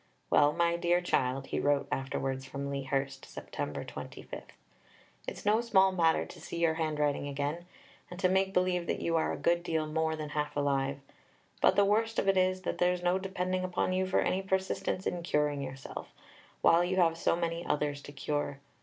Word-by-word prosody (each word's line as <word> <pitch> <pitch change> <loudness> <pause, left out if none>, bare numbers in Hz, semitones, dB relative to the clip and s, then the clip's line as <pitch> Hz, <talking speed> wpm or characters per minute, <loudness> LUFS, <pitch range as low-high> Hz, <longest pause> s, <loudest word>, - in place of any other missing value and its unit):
"Well, 145 0 +5
my 170 +2 +1
dear 175 +1 +2
child," 135 -6 0
he - - -2
wrote 145 -1 +2
afterwards 135 0 -2
from 140 +1 -5
Lea 140 0 -2
Hurst 135 0 -2
(Sept. - - -10 0.3
25), - - -8 0.9
"it's - - -6
no 215 +2 +4
small 195 -5 +4
matter 165 -3 +2
to - - -12
see - - -6
your 165 -1 +3
handwriting 150 -3 0
again, 145 +5 -3 0.4
and 180 - -9
to 185 - +4
make 190 +1 +2
believe 180 -2 +1
that - - -1
you 165 - 0
are 160 - +2
a - - -3
good 170 0 +2
deal 160 -2 -1
more 160 +1 0
than 155 -1 -5
half 150 0 -2
alive. 140 -1 0 0.6
But - - +5
the 200 - +5
worst 225 +2 +1
of - - +1
it 195 - +4
is, 185 0 +2
that - - -3
there's 180 0 +2
no 180 +2 +2
depending 185 -1 -2
upon 185 0 0
you 185 0 +1
for 185 - +2
any 190 - +1
persistence 190 -1 -1
in 175 - -1
curing 150 -4 0
yourself, 135 0 -7 0.5
while 170 +1 +5
you 180 +1 0
have 165 -3 +4
so 165 - +1
many 170 0 -2
others 145 -3 -1
to 145 - -10
cure. 145 0 -2
165 Hz, 195 wpm, -31 LUFS, 145-185 Hz, 0.9 s, Well